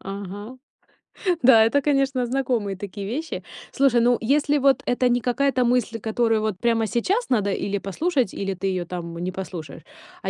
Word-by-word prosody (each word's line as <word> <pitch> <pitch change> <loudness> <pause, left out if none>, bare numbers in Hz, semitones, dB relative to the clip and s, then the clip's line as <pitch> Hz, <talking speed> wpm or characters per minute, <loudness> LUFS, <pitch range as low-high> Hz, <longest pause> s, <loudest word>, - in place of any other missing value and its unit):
Ага. 200 +5 -7 0.9
Да, 235 -3 +7
это, 280 +5 +2
конечно, 275 -3 +1
знакомые 240 -5 -1
такие 200 +1 -7
вещи. 305 +9 -4 0.3
Слушай, 265 -4 +3
ну, 240 +1 +3
если 290 +5 +2
вот 275 -1 +3
это 250 +1 +1
не 245 0 +1
какая-то 255 +2 +1
мысль, 240 -2 0
которую 225 0 +1
вот 215 -3 -2
прямо 230 -2 +1
сейчас 370 - -1
надо 210 -5 +1
или 200 +1 -2
послушать, 250 - -1
или 195 -1 -3
ты 190 +2 -4
её 185 -2 -1
там 170 -1 -6
не 180 +2 -3
послушаешь, 180 -6 -7 0.4
а - - -3
230 Hz, 170 wpm, -23 LUFS, 195-260 Hz, 0.9 s, Да